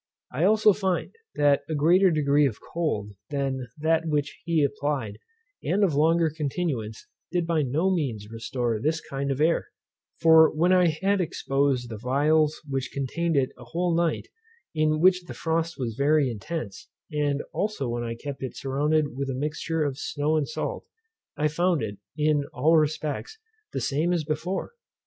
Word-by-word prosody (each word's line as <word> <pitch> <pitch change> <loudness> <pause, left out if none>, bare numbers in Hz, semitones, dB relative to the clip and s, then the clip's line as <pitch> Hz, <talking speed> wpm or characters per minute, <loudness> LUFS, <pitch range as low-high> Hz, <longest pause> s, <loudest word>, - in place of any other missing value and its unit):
I 150 +7 +1
also 215 +1 +5
find, 190 -2 -1 0.2
that 145 -1 +3
a 160 - -1
greater 175 +6 +5
degree 145 -2 +3
of 115 - -5
cold 130 -12 -3 0.2
than 135 -3 -2
that 160 +1 +1
which 150 -2 -2
he 165 -3 +2
applied, 140 -6 -2 0.4
and 205 +2 +1
of 180 -6 +3
longer 160 +2 +3
continuance, 140 -8 -3 0.3
did 175 -2 0
by 165 -2 +1
no 155 +8 +1
means 120 - -2
restore 120 0 -2
this 155 +7 0
kind 140 -1 -4
of 135 0 -1
air: 160 +2 +2 0.5
for 160 -1 +7
when 175 +4 +3
I 180 -1 +5
had 190 +5 +1
exposed 135 -6 0
the 110 -2 -6
phials 150 +5 +2
which 135 -2 -2
contained 160 +5 -1
it 130 -2 +2
a - - -10
whole 170 +8 -1
night, 170 -2 0 0.5
in 155 -1 +1
which 180 0 +4
the - - -8
frost 165 0 -1
was 120 -5 -3
very 140 +1 +2
intense; 110 - -6 0.2
and 145 -1 0
also 205 - -1
when 120 0 -2
I 115 0 -4
kept 140 +3 -7
it 130 - -5
surrounded 145 +1 0
with 135 0 -3
a 130 - -2
mixture 155 +3 -2
of 140 -2 -2
snow 150 +2 -1
and 150 -3 +1
salt, - - -4 0.5
I 150 - +2
found 170 -1 +1
it, 105 -2 -5 0.2
in 150 -1 +2
all 155 +6 +3
respects, 155 - -1 0.3
the - - -3
same 155 +6 +1
as 170 -3 0
before. 160 +5 -3
150 Hz, 170 wpm, -26 LUFS, 135-165 Hz, 0.5 s, for